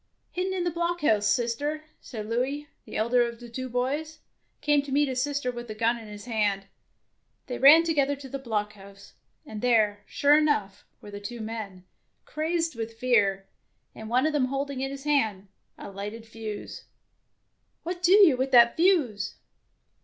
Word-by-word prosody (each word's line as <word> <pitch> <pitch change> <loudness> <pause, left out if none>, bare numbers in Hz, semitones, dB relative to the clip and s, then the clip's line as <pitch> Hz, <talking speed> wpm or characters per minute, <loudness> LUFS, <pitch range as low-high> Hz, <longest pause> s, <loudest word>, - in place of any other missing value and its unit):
" - - -46
Hidden 370 +1 -2
in 360 - -1
the 350 - 0
blockhouse, 335 -11 +1
sister 255 +8 -1
"; - - -16
and 215 -4 -5
Louis, 265 +6 -2 0.2
the - - -6
elder 235 +3 +2
of 235 -1 -2
the 240 -1 -11
two 255 +2 -5
boys, 285 +6 -2 0.4
came 295 -1 +2
to 280 -1 -9
meet 290 +2 +3
his 255 -1 -1
sister 285 -2 -1
with 240 -1 -8
a 215 - -5
gun 230 +2 +1
in 225 - -11
his 210 0 -10
hand. 205 -4 0 0.8
They 250 - -5
ran 300 +5 +8
together 285 -4 +1
to 275 -1 -10
the 275 +1 -5
blockhouse, 210 -4 -5 0.3
and 215 -1 -7
there, 220 -4 +2
sure 285 +1 +4
enough, 210 -11 0 0.2
were 205 - -11
the 205 - -7
two 235 +4 -7
men, 215 -4 -7 0.4
crazed 325 +1 -1
with 225 0 -6
fear, 200 -6 +2 0.5
and 220 0 -9
one 250 +4 +2
of 310 - +1
them 285 -4 +2
holding 275 0 -3
in 270 - -2
his 275 0 -8
hand 220 -10 0 0.3
a - - -9
lighted 210 +3 -7
fuse. 220 -2 -8 0.5
" - - -48
What 355 +1 -5
do 365 +1 +4
you 390 -9 +7
with 260 +2 -1
that 235 -2 +6
fuse 290 - +1
245 Hz, 185 wpm, -27 LUFS, 215-290 Hz, 0.8 s, ran